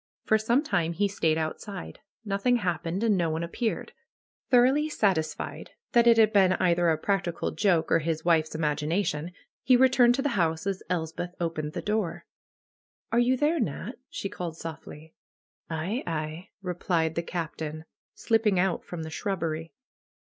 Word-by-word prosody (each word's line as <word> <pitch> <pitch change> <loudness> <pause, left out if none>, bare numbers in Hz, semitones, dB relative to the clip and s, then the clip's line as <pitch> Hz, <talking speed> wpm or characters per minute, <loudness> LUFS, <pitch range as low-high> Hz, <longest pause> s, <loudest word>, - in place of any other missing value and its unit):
For 220 - +3
some 235 +6 +2
time 175 - 0
he 200 +4 +1
stayed 160 -5 +1
outside. 180 +4 -5 0.3
Nothing 200 +5 +1
happened 175 -2 -1
and 220 -3 +3
no 170 -3 +1
one 160 +1 -2
appeared. 220 +7 -3 0.6
Thoroughly 265 +5 +4
satisfied 190 - -1 0.2
that 235 0 +4
it 230 -1 +7
had 220 -1 +5
been 190 -2 +5
either 175 -1 +2
a 160 - +2
practical 190 -1 -1
joke, 180 -6 +1
or 165 - +5
his 160 0 -2
wife's 160 -2 +2
imagination, 150 +2 -1 0.3
he 255 -1 +5
returned 245 -1 +5
to 270 - -1
the 290 - +1
house 165 -8 0
as 195 -1 -2
Elspeth 175 +1 -3
opened 155 -3 -3
the - - -4
door. 210 -4 -2 0.9
^^Are 240 +1 +5
you 255 +2 +2
there, 305 +4 +2
Nat?'' 195 - -3
she - - -4
called 170 -4 -6
softly. 160 -1 -9 0.6
^^Aye, 175 - -2
aye," 160 +1 -4
replied 175 -3 0
the 170 - -1
Captain, 160 -2 -5 0.3
slipping 225 -4 +2
out 185 -1 +1
from 170 -2 -6
the 160 - -7
shrubbery. 165 -3 -3
175 Hz, 155 wpm, -27 LUFS, 160-215 Hz, 0.9 s, it